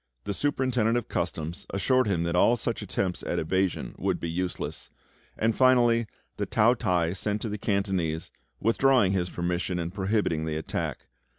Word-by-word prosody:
The 100 Hz, -, -3 dB
Superintendent 125 Hz, -4 st, +1 dB
of 120 Hz, -, -3 dB
Customs 80 Hz, +3 st, -3 dB
assured 130 Hz, +6 st, +2 dB
him 90 Hz, -5 st, +1 dB
that 85 Hz, +1 st, -1 dB
all 115 Hz, +6 st, +5 dB
such 115 Hz, 0 st, -2 dB
attempts 95 Hz, -2 st, -2 dB
at -, -, -2 dB
evasion 95 Hz, +3 st, 0 dB
would -, -, 0 dB
be 85 Hz, -, -3 dB
useless; 90 Hz, +1 st, -4 dB, 0.5 s
and, 110 Hz, 0 st, +1 dB
finally, 120 Hz, -3 st, +4 dB, 0.3 s
the -, -, -2 dB
Tao 115 Hz, +3 st, +4 dB
t'ai 90 Hz, -8 st, 0 dB
sent 105 Hz, +2 st, -2 dB
to 115 Hz, -, -2 dB
the 105 Hz, 0 st, -4 dB
Cantonese, 95 Hz, -6 st, -1 dB, 0.3 s
withdrawing 120 Hz, -3 st, +3 dB
his 90 Hz, -2 st, 0 dB
permission, 90 Hz, +1 st, -2 dB
and 85 Hz, 0 st, -3 dB
prohibiting 95 Hz, -5 st, 0 dB
the 80 Hz, -1 st, -2 dB
attack. 80 Hz, -, -3 dB
100 Hz, 165 wpm, -27 LUFS, 85-115 Hz, 0.5 s, all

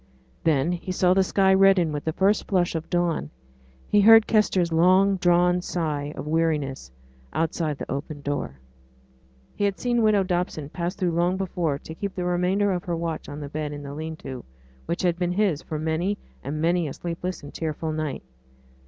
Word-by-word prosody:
Then 155 Hz, 0 st, +2 dB
he 180 Hz, +1 st, -4 dB
saw 180 Hz, 0 st, +3 dB
the 190 Hz, -, +4 dB
sky 190 Hz, 0 st, +3 dB
redden 190 Hz, -4 st, +5 dB
with 145 Hz, -1 st, -4 dB
the 160 Hz, -, -1 dB
first 195 Hz, +4 st, +2 dB
flush 180 Hz, -3 st, +1 dB
of 165 Hz, -1 st, -4 dB
dawn; 175 Hz, -, 0 dB, 0.6 s
he 205 Hz, -, +4 dB
heard 225 Hz, +1 st, +8 dB
Kester's 190 Hz, -6 st, +2 dB
long 185 Hz, +4 st, +4 dB
drawn 180 Hz, 0 st, +3 dB
sigh 150 Hz, -5 st, -2 dB
of -, -, -6 dB
weariness 150 Hz, -, -1 dB, 0.4 s
outside 160 Hz, -2 st, -1 dB
the -, -, -6 dB
open 145 Hz, +2 st, -5 dB
door. 140 Hz, -, -3 dB, 1.0 s
He -, -, -3 dB
had 200 Hz, -1 st, 0 dB
seen 240 Hz, -1 st, +1 dB
widow 215 Hz, -3 st, +4 dB
Dobson 175 Hz, -5 st, -2 dB
pass 175 Hz, +2 st, -3 dB
through 180 Hz, -2 st, 0 dB
long 175 Hz, +2 st, +1 dB
before 175 Hz, -6 st, -1 dB
to 160 Hz, -, -10 dB
keep 200 Hz, +3 st, -5 dB
the 180 Hz, -, -2 dB
remainder 180 Hz, +3 st, +1 dB
of 180 Hz, -2 st, -2 dB
her 175 Hz, -, -1 dB
watch 165 Hz, -1 st, -4 dB
on 145 Hz, +1 st, -7 dB
the 145 Hz, -, -6 dB
bed 150 Hz, 0 st, -4 dB
in 145 Hz, 0 st, -7 dB
the 140 Hz, 0 st, -7 dB
lean 160 Hz, +2 st, -5 dB
to, 130 Hz, -4 st, -8 dB, 0.4 s
which 170 Hz, +3 st, -2 dB
had 175 Hz, -1 st, +1 dB
been 180 Hz, -1 st, 0 dB
his 190 Hz, -6 st, +1 dB
for 155 Hz, -, -5 dB
many 160 Hz, +6 st, -1 dB, 0.3 s
and 145 Hz, +3 st, -4 dB
many 170 Hz, +1 st, +1 dB
a 135 Hz, -, -5 dB
sleepless 175 Hz, 0 st, -5 dB
and 145 Hz, -, -10 dB
tearful 160 Hz, 0 st, -3 dB
night. 155 Hz, -, -3 dB
170 Hz, 190 wpm, -25 LUFS, 155-185 Hz, 1.0 s, heard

